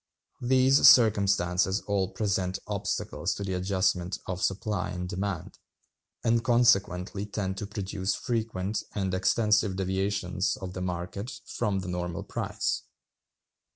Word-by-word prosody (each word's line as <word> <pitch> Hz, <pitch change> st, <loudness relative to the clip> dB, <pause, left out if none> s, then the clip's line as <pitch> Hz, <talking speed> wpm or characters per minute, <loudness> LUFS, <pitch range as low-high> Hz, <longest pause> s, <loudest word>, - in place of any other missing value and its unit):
These 130 Hz, +2 st, +6 dB
circumstances 100 Hz, -6 st, +4 dB
all 100 Hz, -2 st, 0 dB
present 95 Hz, -3 st, -1 dB
obstacles -, -, -2 dB
to 100 Hz, -, -5 dB
the 95 Hz, -1 st, -2 dB
adjustment 95 Hz, -1 st, 0 dB
of 90 Hz, 0 st, -4 dB
supply 95 Hz, -1 st, -1 dB
and 90 Hz, 0 st, -4 dB
demand, 95 Hz, -2 st, -4 dB, 0.6 s
and 115 Hz, 0 st, +2 dB
consequently 100 Hz, -5 st, +2 dB
tend 95 Hz, -2 st, -3 dB
to 105 Hz, -, -4 dB
produce 100 Hz, -1 st, -2 dB
frequent 110 Hz, -4 st, -2 dB
and 95 Hz, -2 st, -1 dB
extensive 105 Hz, +1 st, +2 dB
deviations 95 Hz, 0 st, -1 dB
of 95 Hz, -2 st, -7 dB
the 90 Hz, -, -5 dB
market 90 Hz, +6 st, -4 dB
from 100 Hz, -2 st, -1 dB
the 90 Hz, -, -7 dB
normal 90 Hz, -1 st, -3 dB
price. -, -, -2 dB
95 Hz, 120 wpm, -28 LUFS, 90-105 Hz, 0.6 s, These